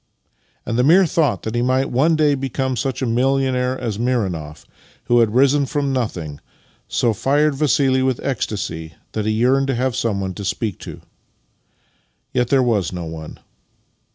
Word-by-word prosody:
" -, -, -42 dB
And 115 Hz, -, -1 dB
the -, -, +4 dB
mere 180 Hz, +7 st, +6 dB
thought 160 Hz, -5 st, 0 dB
that 110 Hz, -, -4 dB
he 120 Hz, -, 0 dB
might 130 Hz, +2 st, +1 dB
one 150 Hz, +7 st, +3 dB
day 150 Hz, -2 st, +3 dB
be 135 Hz, -1 st, -3 dB
come 130 Hz, +1 st, -1 dB
such 130 Hz, +2 st, -2 dB
a -, -, +1 dB
millionaire 130 Hz, +1 st, +1 dB
as 110 Hz, -4 st, -3 dB
Mironoff, 95 Hz, -12 st, -2 dB, 0.4 s
who 120 Hz, 0 st, +3 dB
had 115 Hz, -1 st, +2 dB
risen 140 Hz, +2 st, +4 dB
from 140 Hz, 0 st, -1 dB
nothing, 85 Hz, -, -3 dB, 0.5 s
so 115 Hz, -2 st, +1 dB
fired 145 Hz, +7 st, +2 dB
Vassili 135 Hz, -2 st, +2 dB
with 130 Hz, -2 st, 0 dB
ecstasy 90 Hz, -, -3 dB, 0.2 s
that 110 Hz, -1 st, -3 dB
he -, -, +2 dB
yearned 130 Hz, +5 st, +2 dB
to 135 Hz, -, 0 dB
have 125 Hz, 0 st, -1 dB
someone 100 Hz, -4 st, -1 dB
to 100 Hz, -, -7 dB
speak 100 Hz, +1 st, -3 dB
to. -, -, -9 dB, 1.3 s
Yet 125 Hz, -1 st, +1 dB
there 135 Hz, 0 st, +3 dB
was 110 Hz, -7 st, +1 dB
no 90 Hz, -2 st, -5 dB
one. 80 Hz, -1 st, -8 dB
125 Hz, 175 wpm, -20 LUFS, 110-135 Hz, 1.3 s, mere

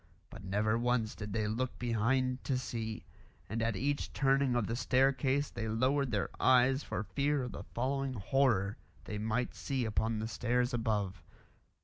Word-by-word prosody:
But -, -, -10 dB
never 105 Hz, +4 st, +1 dB
once 120 Hz, -2 st, +1 dB
did 105 Hz, -1 st, -7 dB
they 105 Hz, +1 st, 0 dB
look 120 Hz, +4 st, -2 dB
behind 125 Hz, +2 st, 0 dB
to 135 Hz, -, +1 dB
see; 110 Hz, -6 st, -4 dB, 0.4 s
and 110 Hz, +3 st, -2 dB
at 115 Hz, -2 st, +1 dB
each 140 Hz, +7 st, -1 dB
turning 135 Hz, -1 st, +2 dB
of 120 Hz, -3 st, +1 dB
the 115 Hz, -, -2 dB
staircase 135 Hz, +2 st, +2 dB
they 110 Hz, -, -4 dB
lowered 130 Hz, +5 st, +1 dB
their 105 Hz, -4 st, -1 dB
eyes 130 Hz, +1 st, +5 dB
for 100 Hz, -, -3 dB
fear 140 Hz, +3 st, 0 dB
of 125 Hz, -, -4 dB
the -, -, -8 dB
following 135 Hz, +2 st, -1 dB
horror 110 Hz, -2 st, +1 dB, 0.3 s
they 105 Hz, -, -5 dB
might 110 Hz, +3 st, -1 dB
see 130 Hz, -3 st, -2 dB
upon 110 Hz, +1 st, 0 dB
the 110 Hz, +1 st, -2 dB
stairs 120 Hz, +2 st, 0 dB
above. 105 Hz, -5 st, -1 dB
120 Hz, 165 wpm, -33 LUFS, 110-130 Hz, 0.4 s, eyes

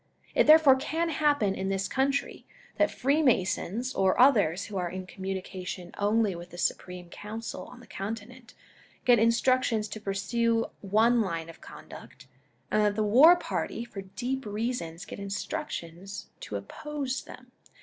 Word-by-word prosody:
It -, -, +3 dB
therefore 305 Hz, -4 st, +8 dB
can 330 Hz, +5 st, -1 dB
happen 285 Hz, -10 st, +2 dB
in 190 Hz, 0 st, -3 dB
this 195 Hz, 0 st, -1 dB
country, 275 Hz, +1 st, -1 dB, 0.3 s
that -, -, +3 dB
Freemasons 255 Hz, -, +1 dB
or 190 Hz, -1 st, +2 dB
others 205 Hz, -, +4 dB
who 205 Hz, -, -6 dB
are 180 Hz, -1 st, -1 dB
in 185 Hz, +1 st, -6 dB
communication 185 Hz, -1 st, -6 dB
only 210 Hz, 0 st, +2 dB
with 175 Hz, +1 st, -9 dB
the 175 Hz, -, -11 dB
Supreme 180 Hz, 0 st, -3 dB
Council 210 Hz, -3 st, -7 dB
on 250 Hz, -, -13 dB
the -, -, -14 dB
Continent, 225 Hz, +5 st, -7 dB, 0.5 s
get 245 Hz, -2 st, +6 dB
instructions 230 Hz, -1 st, +2 dB
to 215 Hz, -, -7 dB
pursue 225 Hz, +4 st, 0 dB, 0.2 s
one 225 Hz, +4 st, +3 dB
line 165 Hz, -5 st, -3 dB
of 165 Hz, -, -13 dB
conduct, -, -, -12 dB, 0.5 s
and 215 Hz, -, +3 dB
that 205 Hz, -1 st, +2 dB
the 215 Hz, -, +1 dB
war 265 Hz, +12 st, +7 dB
party 235 Hz, -8 st, -3 dB
for 205 Hz, -4 st, -8 dB
deep 245 Hz, +8 st, -4 dB
reasons 205 Hz, -6 st, -3 dB
get -, -, -8 dB
instructions 195 Hz, -, -5 dB
to -, -, -7 dB
oppose 285 Hz, -3 st, -4 dB
them. 250 Hz, 0 st, -13 dB
215 Hz, 150 wpm, -28 LUFS, 190-255 Hz, 0.5 s, therefore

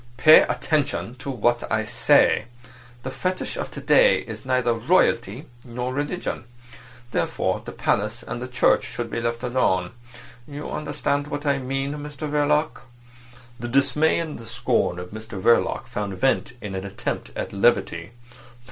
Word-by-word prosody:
"Pay 155 Hz, +4 st, +8 dB
attention 145 Hz, -6 st, -1 dB
to 135 Hz, -, -7 dB
what 120 Hz, -1 st, +1 dB
I -, -, +1 dB
say. -, -, +3 dB, 0.6 s
The -, -, -4 dB
fetish 185 Hz, 0 st, -3 dB
of -, -, -4 dB
to -, -, -8 dB
day -, -, +5 dB
is -, -, -9 dB
neither 125 Hz, -2 st, +2 dB
royalty 120 Hz, -, +1 dB, 0.2 s
nor 125 Hz, +1 st, -4 dB
religion. 145 Hz, -1 st, -3 dB, 0.7 s
Therefore -, -, -1 dB
the -, -, -7 dB
palace 105 Hz, +4 st, -1 dB
and 120 Hz, -, -6 dB
the 125 Hz, -, -4 dB
church 125 Hz, -1 st, +3 dB
should 120 Hz, -1 st, -5 dB
be 115 Hz, -, -2 dB
left 115 Hz, +1 st, -2 dB
alone. 95 Hz, -8 st, +1 dB, 0.6 s
You 145 Hz, 0 st, -7 dB
understand 145 Hz, -1 st, -2 dB
what 145 Hz, +1 st, -5 dB
I 140 Hz, -1 st, +2 dB
mean, 135 Hz, +1 st, -2 dB
Mr 150 Hz, +1 st, -6 dB
Verloc?" 150 Hz, +1 st, +1 dB, 0.8 s
The 120 Hz, -, -4 dB
dismay 140 Hz, +5 st, +2 dB
and 160 Hz, -5 st, -5 dB
the 115 Hz, -, -11 dB
scorn 115 Hz, -5 st, 0 dB
of 90 Hz, 0 st, -7 dB
Mr 110 Hz, -2 st, -7 dB
Verloc 115 Hz, +5 st, +2 dB
found 100 Hz, -2 st, -4 dB
vent 135 Hz, +4 st, +1 dB
in 100 Hz, -2 st, -6 dB
an 95 Hz, 0 st, -4 dB
attempt 100 Hz, -9 st, -4 dB
at -, -, -4 dB
levity. 95 Hz, -5 st, +1 dB
125 Hz, 155 wpm, -24 LUFS, 115-145 Hz, 0.8 s, Pay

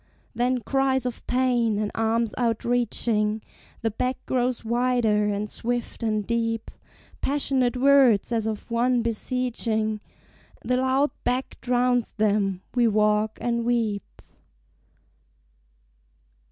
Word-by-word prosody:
Then 245 Hz, +1 st, 0 dB
cries 265 Hz, +1 st, +1 dB
of 245 Hz, -2 st, -4 dB
pain, 245 Hz, -4 st, +2 dB
and 210 Hz, 0 st, -1 dB
arms 225 Hz, 0 st, 0 dB
outreaching 230 Hz, -2 st, 0 dB, 0.4 s
The 225 Hz, -, +1 dB
beck 250 Hz, +4 st, -1 dB
grows 250 Hz, -2 st, -1 dB
wider 235 Hz, -3 st, +2 dB
and 205 Hz, 0 st, -1 dB
swift 240 Hz, +2 st, -4 dB
and 215 Hz, -2 st, 0 dB
deep; 230 Hz, 0 st, -1 dB, 0.5 s
Passionate 265 Hz, -3 st, +1 dB
words 260 Hz, -5 st, +4 dB
as 225 Hz, -2 st, 0 dB
of 220 Hz, +1 st, -5 dB
one 240 Hz, +1 st, +2 dB
beseeching 225 Hz, -2 st, -1 dB, 0.6 s
The 250 Hz, -, +1 dB
loud 260 Hz, +3 st, +2 dB
beck 255 Hz, +2 st, -2 dB
drowns 245 Hz, -1 st, +1 dB
them: 200 Hz, -3 st, 0 dB
we 245 Hz, -2 st, +3 dB
walk 210 Hz, 0 st, +2 dB
and 235 Hz, -1 st, 0 dB
weep. 230 Hz, -4 st, -2 dB
235 Hz, 110 wpm, -25 LUFS, 215-250 Hz, 0.6 s, words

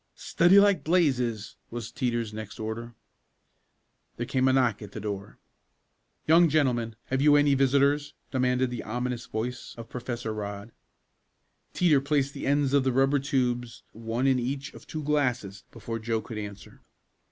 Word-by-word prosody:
"Study 175 Hz, +4 st, +4 dB
like 200 Hz, -1 st, +4 dB
blazes!" 125 Hz, -, 0 dB
was 120 Hz, -1 st, -6 dB
Teeter's 120 Hz, -4 st, -2 dB
next 110 Hz, -1 st, -8 dB
order. 115 Hz, +2 st, -5 dB, 1.2 s
There 120 Hz, -, -2 dB
came 130 Hz, +1 st, +1 dB
a 130 Hz, -, +4 dB
knock 125 Hz, -5 st, +2 dB
at 100 Hz, -2 st, -10 dB
the -, -, -5 dB
door. 100 Hz, -1 st, -6 dB, 0.9 s
"Young 165 Hz, +1 st, +6 dB
gentlemen 125 Hz, -7 st, +1 dB
have 130 Hz, 0 st, 0 dB
you 145 Hz, 0 st, +6 dB
any 145 Hz, -1 st, +4 dB
visitors?" 140 Hz, +2 st, +2 dB, 0.2 s
demanded 125 Hz, -1 st, +1 dB
the 120 Hz, -, -4 dB
ominous 125 Hz, +2 st, -4 dB
voice 120 Hz, +3 st, -5 dB
of 115 Hz, 0 st, -9 dB
Professor 120 Hz, -2 st, -4 dB
Rodd. 105 Hz, +1 st, -6 dB, 1.0 s
Teeter 155 Hz, -6 st, +4 dB
placed 140 Hz, -1 st, 0 dB
the -, -, -5 dB
ends 140 Hz, -1 st, +2 dB
of 140 Hz, -2 st, +4 dB
the 130 Hz, -, +1 dB
rubber 135 Hz, +3 st, +3 dB
tubes 125 Hz, -5 st, -1 dB
one 115 Hz, +3 st, -3 dB
in 130 Hz, -2 st, +3 dB
each 135 Hz, +5 st, -4 dB
of -, -, -14 dB
two 155 Hz, -1 st, -5 dB
glasses 125 Hz, -9 st, -1 dB
before 115 Hz, 0 st, -6 dB
Joe 115 Hz, 0 st, -1 dB
could 110 Hz, -2 st, -7 dB
answer. 100 Hz, -1 st, -9 dB
125 Hz, 155 wpm, -27 LUFS, 115-140 Hz, 1.2 s, Young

